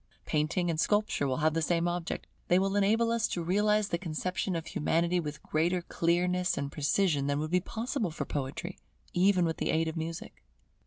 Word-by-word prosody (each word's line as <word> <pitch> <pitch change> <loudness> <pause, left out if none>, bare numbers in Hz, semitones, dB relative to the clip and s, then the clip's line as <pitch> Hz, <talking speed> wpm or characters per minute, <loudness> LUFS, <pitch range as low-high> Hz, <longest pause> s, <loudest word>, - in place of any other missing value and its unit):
Painting 165 +3 0
and 155 - -3
Sculpture 205 -6 +1
will 130 -1 0
have 155 - +4
the 165 - 0
same 170 +2 +1
object; 175 -1 -3 0.2
they 180 - +4
will 195 +1 +1
enable 220 +3 +3
us 230 0 +1
to 175 - -3
realize 210 +3 +2
the 170 - -1
conception 180 +2 -2
of 165 -1 -3
Humanity 170 +2 +1
with 150 -2 -5
greater 170 +3 0
clearness 180 +2 +1
and 140 0 -3
precision 150 -1 +1
than 145 0 +1
would 155 +2 -3
be 180 - +4
possible 225 - -2
for 160 - -4
Poetry, 145 +6 -4 0.3
even 185 0 +4
with 160 -1 -1
the - - -2
aid 160 0 +2
of 160 - -3
Music. 165 +6 -6
175 Hz, 195 wpm, -30 LUFS, 160-190 Hz, 0.3 s, have